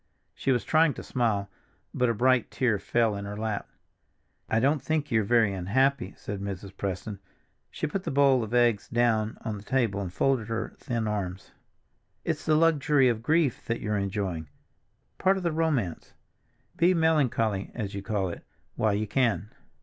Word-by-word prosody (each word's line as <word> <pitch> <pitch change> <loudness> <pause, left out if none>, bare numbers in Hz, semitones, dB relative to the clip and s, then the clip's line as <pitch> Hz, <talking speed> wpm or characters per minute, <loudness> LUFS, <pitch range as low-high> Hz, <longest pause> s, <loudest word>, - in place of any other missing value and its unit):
She 135 - -1
was 125 -2 +1
trying 155 -2 +3
to - - -7
smile, 110 -5 0 0.5
but 125 -1 +2
a 115 - 0
bright 130 +2 +3
tear 115 -6 +1
fell 115 -1 +1
in 100 0 -5
her 100 +1 -6
lap. 110 -1 -3 0.8
"I 110 - +2
don't 140 +4 +2
think 150 0 -1
you're 110 -1 +3
very 110 -1 +3
unhappy," 125 +9 +1
said 100 -2 -6
Mrs. 100 0 -6
Preston. 100 +1 -4 0.5
She - - -4
put 185 +5 -3
the - - -3
bowl 135 -3 +4
of 110 - -6
eggs 120 -4 +3
down 115 -2 +1
on 110 -2 -2
the 100 - -11
table 115 -5 0
and 90 -3 -4
folded 125 +2 +1
her 115 -1 -3
thin 115 -3 -2
arms. 95 -3 -4 0.7
"It's - - -2
the 155 - +4
luxury 150 -4 +4
of 115 -2 -1
grief 155 0 +1
that 115 0 -1
you're 105 -1 -2
enjoying—part 100 - -3
of 190 - -4
the 170 - +1
romance. 150 - -1 0.6
Be 180 +2 +4
melancholy—as 115 - 0
you 100 - -4
call 95 -2 -1
it—while 105 +4 -3
you 105 +1 -1
can." 110 -2 0
115 Hz, 165 wpm, -27 LUFS, 100-135 Hz, 0.8 s, bowl